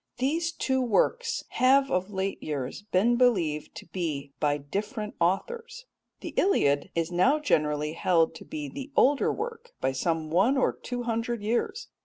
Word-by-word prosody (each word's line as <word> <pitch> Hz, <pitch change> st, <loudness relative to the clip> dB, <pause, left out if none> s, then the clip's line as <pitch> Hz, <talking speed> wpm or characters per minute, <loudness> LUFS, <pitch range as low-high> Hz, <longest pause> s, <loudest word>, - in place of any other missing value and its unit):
These 325 Hz, +6 st, 0 dB
two 265 Hz, -4 st, 0 dB
works 475 Hz, -, +1 dB
have 270 Hz, +1 st, +3 dB
of 185 Hz, +2 st, 0 dB
late 195 Hz, -1 st, -3 dB
years 140 Hz, +2 st, -4 dB
been 230 Hz, +6 st, +3 dB
believed 175 Hz, -12 st, +1 dB
to -, -, -9 dB
be 155 Hz, -5 st, -4 dB
by 145 Hz, -1 st, +2 dB
different 210 Hz, -, -4 dB
authors. 465 Hz, -, -1 dB, 0.4 s
The -, -, -6 dB
Iliad 145 Hz, -, +2 dB
is 165 Hz, +1 st, -1 dB
now 215 Hz, +12 st, +4 dB
generally 150 Hz, -, 0 dB
held 165 Hz, -1 st, +2 dB
to -, -, -10 dB
be 300 Hz, -1 st, -5 dB
the 280 Hz, 0 st, -8 dB
older 280 Hz, +2 st, +4 dB
work 470 Hz, +2 st, -6 dB
by 135 Hz, -, +1 dB
some 155 Hz, +3 st, -1 dB
one 205 Hz, -, +3 dB
or 265 Hz, -, +2 dB
two 245 Hz, -1 st, -5 dB
hundred 230 Hz, -1 st, -2 dB
years. 240 Hz, -, -1 dB
215 Hz, 160 wpm, -27 LUFS, -, 0.4 s, now